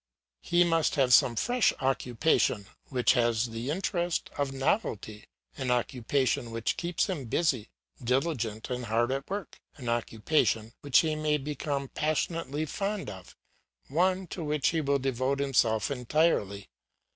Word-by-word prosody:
He 175 Hz, 0 st, +3 dB
must 165 Hz, -2 st, +2 dB
have 130 Hz, -3 st, +3 dB
some 120 Hz, -, +6 dB
fresh 245 Hz, -, +2 dB
occupation 125 Hz, -4 st, +1 dB, 0.2 s
which 125 Hz, -3 st, +3 dB
has 120 Hz, 0 st, +1 dB
the 115 Hz, +3 st, -4 dB
interest 175 Hz, +1 st, -1 dB
of 140 Hz, -2 st, -1 dB
novelty 115 Hz, -, -2 dB, 0.3 s
an 130 Hz, -2 st, -2 dB
occupation 125 Hz, 0 st, 0 dB
which 115 Hz, 0 st, -1 dB
keeps 175 Hz, -1 st, 0 dB
him 170 Hz, -9 st, -3 dB
busy, 125 Hz, -2 st, 0 dB, 0.3 s
diligent, 125 Hz, -4 st, -1 dB
and 125 Hz, -1 st, -3 dB
hard 115 Hz, +3 st, +1 dB
at 135 Hz, +1 st, -3 dB
work, 200 Hz, -3 st, -5 dB, 0.2 s
an 125 Hz, -4 st, -5 dB
occupation 115 Hz, 0 st, 0 dB
which 140 Hz, -3 st, +5 dB
he 155 Hz, -2 st, -1 dB
may 155 Hz, 0 st, +1 dB
become 140 Hz, -1 st, -3 dB
passionately 155 Hz, 0 st, -1 dB
fond 200 Hz, +6 st, -3 dB
of, 95 Hz, -2 st, -12 dB, 0.5 s
one 185 Hz, +5 st, +1 dB
to 170 Hz, 0 st, -6 dB
which 150 Hz, -2 st, +1 dB
he 165 Hz, -1 st, 0 dB
will 140 Hz, -1 st, +2 dB
devote 135 Hz, +1 st, -1 dB
himself 120 Hz, -5 st, +2 dB
entirely. 125 Hz, -, +1 dB
135 Hz, 140 wpm, -29 LUFS, 120-155 Hz, 0.5 s, some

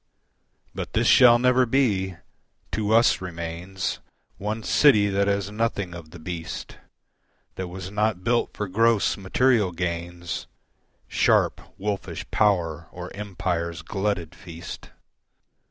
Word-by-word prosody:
But -, -, -6 dB
this -, -, +2 dB
shall 120 Hz, -2 st, +7 dB
never 125 Hz, +1 st, +3 dB
be: 105 Hz, -8 st, +1 dB, 0.6 s
to 110 Hz, -1 st, -1 dB
us 115 Hz, -2 st, +4 dB
remains 85 Hz, +1 st, -4 dB, 0.4 s
One 110 Hz, +2 st, -3 dB
city 105 Hz, -8 st, +5 dB
that 100 Hz, 0 st, +1 dB
has 100 Hz, 0 st, 0 dB
nothing 105 Hz, -4 st, -1 dB
of 85 Hz, -2 st, -9 dB
the 90 Hz, -, -11 dB
beast, 80 Hz, 0 st, -6 dB, 0.7 s
That 95 Hz, -, -5 dB
was 95 Hz, +1 st, -7 dB
not 105 Hz, -3 st, 0 dB
built 120 Hz, +2 st, 0 dB
for 105 Hz, -, -2 dB
gross, 115 Hz, +3 st, +3 dB
material 105 Hz, +1 st, +2 dB
gains, 85 Hz, 0 st, -4 dB, 0.6 s
Sharp, -, -, +2 dB, 0.2 s
wolfish 100 Hz, 0 st, -4 dB
power 85 Hz, -6 st, +1 dB
or 90 Hz, 0 st, -8 dB
empire's 90 Hz, -4 st, -3 dB
glutted 95 Hz, -5 st, -2 dB
feast. 85 Hz, -1 st, -9 dB
95 Hz, 120 wpm, -25 LUFS, 85-110 Hz, 0.7 s, shall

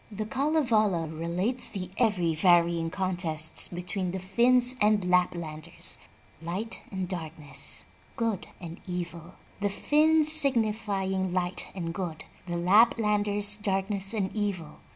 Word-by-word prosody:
The 215 Hz, +1 st, -4 dB
Kalevala 230 Hz, -, +1 dB
relates 180 Hz, +10 st, -2 dB
the 185 Hz, -3 st, -6 dB
every 190 Hz, -9 st, +1 dB
varying 170 Hz, 0 st, +3 dB
contests 175 Hz, -4 st, 0 dB
between 180 Hz, +1 st, -4 dB
the 190 Hz, +2 st, -4 dB
Finns 245 Hz, +6 st, +3 dB
and 210 Hz, -2 st, +3 dB
Lap 180 Hz, 0 st, +3 dB
landers, 155 Hz, -2 st, -3 dB, 0.4 s
Light 190 Hz, +8 st, -4 dB
and 190 Hz, -2 st, -3 dB
Darkness, 160 Hz, -4 st, -3 dB, 0.3 s
Good 225 Hz, -5 st, -2 dB
and 170 Hz, -1 st, -9 dB
Evil, 175 Hz, -1 st, -6 dB, 0.2 s
the 205 Hz, 0 st, 0 dB
Finns 305 Hz, +8 st, +3 dB
signi 275 Hz, -9 st, +3 dB
fying 190 Hz, -3 st, -2 dB
Light 180 Hz, 0 st, -1 dB
and 165 Hz, -3 st, -4 dB
Good, 175 Hz, -3 st, -5 dB, 0.2 s
the 175 Hz, -, -3 dB
Laplanders 205 Hz, +1 st, +3 dB
Darkness 195 Hz, 0 st, 0 dB
and 195 Hz, -2 st, -2 dB
Evil. 195 Hz, -7 st, -3 dB
190 Hz, 125 wpm, -28 LUFS, 175-215 Hz, 0.4 s, varying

